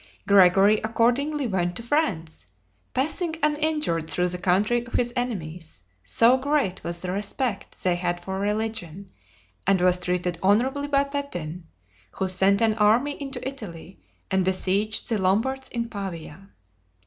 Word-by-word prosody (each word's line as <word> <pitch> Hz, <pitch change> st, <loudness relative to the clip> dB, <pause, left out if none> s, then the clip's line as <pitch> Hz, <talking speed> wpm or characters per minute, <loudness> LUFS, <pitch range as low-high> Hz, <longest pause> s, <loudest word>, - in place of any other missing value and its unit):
Gregory 195 Hz, +2 st, +6 dB
accordingly 245 Hz, +6 st, +1 dB
went 175 Hz, -5 st, -1 dB
to 230 Hz, -, -5 dB
France, 205 Hz, -, -1 dB, 0.4 s
passing 320 Hz, +5 st, -1 dB
uninjured 300 Hz, -, 0 dB
through 180 Hz, 0 st, +1 dB
the 180 Hz, 0 st, -3 dB
country 205 Hz, +7 st, +2 dB
of -, -, -13 dB
his 240 Hz, -1 st, 0 dB
enemies, 170 Hz, -, -5 dB, 0.2 s
so 230 Hz, -, +4 dB
great 275 Hz, -8 st, 0 dB
was 170 Hz, +1 st, -5 dB
the 180 Hz, -, -2 dB
respect 205 Hz, +3 st, -3 dB
they 180 Hz, -, +3 dB
had 175 Hz, 0 st, -2 dB
for 190 Hz, +2 st, -5 dB
religion, 205 Hz, -3 st, -3 dB, 0.6 s
and 195 Hz, -1 st, +4 dB
was 180 Hz, 0 st, +3 dB
treated 180 Hz, -1 st, -1 dB
honorably 255 Hz, +9 st, +2 dB
by 280 Hz, -1 st, +3 dB
Pepin, 180 Hz, -, -5 dB, 0.5 s
who 190 Hz, -, -2 dB
sent 190 Hz, +2 st, +2 dB
an 225 Hz, -1 st, +4 dB
army 225 Hz, +7 st, +4 dB
into 270 Hz, -2 st, -5 dB
Italy, 195 Hz, -9 st, -8 dB, 0.3 s
and 190 Hz, 0 st, +2 dB
besieged 190 Hz, +3 st, 0 dB
the 225 Hz, -3 st, +1 dB
Lombards 255 Hz, +8 st, 0 dB
in 235 Hz, -1 st, -3 dB
Pavia. 195 Hz, -3 st, -7 dB
200 Hz, 140 wpm, -25 LUFS, 180-250 Hz, 0.6 s, Gregory